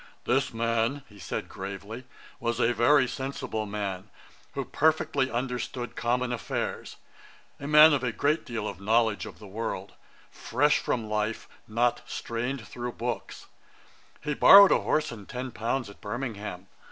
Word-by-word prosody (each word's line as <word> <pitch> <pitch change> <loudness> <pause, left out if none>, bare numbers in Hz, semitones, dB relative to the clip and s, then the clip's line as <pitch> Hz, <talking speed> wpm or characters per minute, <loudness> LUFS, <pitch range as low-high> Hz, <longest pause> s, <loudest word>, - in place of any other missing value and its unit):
'This 135 +2 +1
man 115 +4 0 0.2
(said - - -4
he, - - -21
gravely) 100 +5 -7 0.3
was 120 0 -2
a 120 - +3
very 130 +4 +4
sensible 130 -4 -4
man, 100 -1 -4 0.5
who - - -2
perfectly 145 -3 +1
understood 125 0 -3
common 125 +1 0
affairs: 120 - -4 0.6
a 140 - -6
man 150 +1 +8
of 135 -3 0
a 125 - 0
great 150 +7 0
deal 115 -3 -4
of 100 -2 -7
knowledge 110 +1 +2
of - - -11
the 105 - -12
world, 110 +3 -5 0.4
fresh 145 +5 +1
from 115 -3 -2
life, 105 +1 -2 0.2
not 120 +2 +1
strained 115 0 -4
through 120 0 -5
books. 120 0 -5 0.8
He 150 0 -2
borrowed 200 +6 +9
a - - +5
horse 155 - 0
and 105 -4 -10
ten 125 +1 -5
pounds 115 +4 -2
at 100 - -14
Birmingham. 105 -5 -5
120 Hz, 150 wpm, -27 LUFS, 110-130 Hz, 0.8 s, borrowed